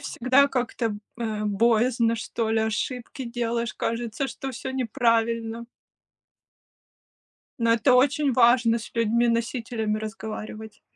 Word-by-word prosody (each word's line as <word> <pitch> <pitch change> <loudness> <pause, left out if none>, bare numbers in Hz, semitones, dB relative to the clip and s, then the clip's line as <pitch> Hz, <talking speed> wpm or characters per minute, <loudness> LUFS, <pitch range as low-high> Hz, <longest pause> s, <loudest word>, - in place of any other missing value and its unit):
всегда 275 0 +3
как-то, 240 -4 -2 0.2
э, 220 -2 -3
боязно, 230 +3 +2
что 225 0 -3
ли, 225 - +2
ошибки 230 +4 -3
делаешь, 235 -1 -2
кажется, 230 +3 -2
что 270 0 -6
всё 260 +1 -6
неправильно. 230 -2 0 1.9
Но 230 -1 +3
это 245 +3 +3
очень 280 +2 +3
важно 235 -1 +4
с 225 - -10
людьми-носителями 230 -1 0
разговаривать. 220 0 -7
230 Hz, 105 wpm, -25 LUFS, 225-250 Hz, 1.9 s, важно